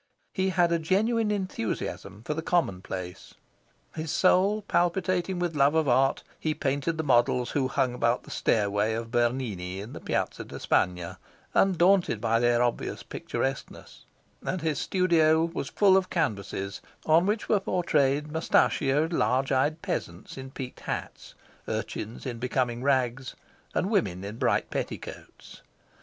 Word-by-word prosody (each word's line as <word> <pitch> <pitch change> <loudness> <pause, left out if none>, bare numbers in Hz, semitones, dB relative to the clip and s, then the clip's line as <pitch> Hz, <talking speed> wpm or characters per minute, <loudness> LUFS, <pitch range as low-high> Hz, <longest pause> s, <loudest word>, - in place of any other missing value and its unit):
He 190 0 +1
had 175 -2 +2
a 170 - +2
genuine 215 +7 +1
enthusiasm 115 - -3
for 150 - -1
the 160 - -3
commonplace. 95 - -2 0.6
His 160 0 -5
soul 195 +5 +3
palpitating 180 0 0
with 175 -2 -2
love 140 +2 +4
of 160 -2 +2
art, 135 +2 +3 0.2
he 155 -1 -1
painted 140 +3 -1
the 160 - -1
models 125 -2 +2
who 135 -3 +1
hung 130 -2 0
about 120 0 +1
the - - -12
stairway 105 0 +1
of 115 0 -5
Bernini 115 -7 -1
in 105 +5 -8
the - - -7
Piazza - - -2
de - - -9
Spagna, 90 -1 0 0.3
undaunted 185 - +3
by 115 +1 +1
their 120 0 +3
obvious 120 -1 -2
picturesqueness; 135 0 -5 0.4
and 185 - -2
his 155 -2 -1
studio 165 -4 +3
was 170 0 -4
full 195 -2 +4
of 190 -1 +2
canvases 100 - -2 0.2
on 165 +4 +4
which 210 +2 -1
were 210 - +3
portrayed 150 -6 +1
moustachioed, 155 -1 +2
large 130 0 +1
eyed 145 +4 +1
peasants 85 +4 -4
in 130 0 -8
peaked 130 -1 -7
hats, - - -6 0.3
urchins 110 +3 -4
in 120 -3 -4
becoming 125 -1 -1
rags, 130 -2 0 0.4
and 195 - 0
women 95 - 0
in 105 +3 -6
bright 130 - +1
petticoats. - - -7
140 Hz, 145 wpm, -27 LUFS, 120-175 Hz, 0.6 s, love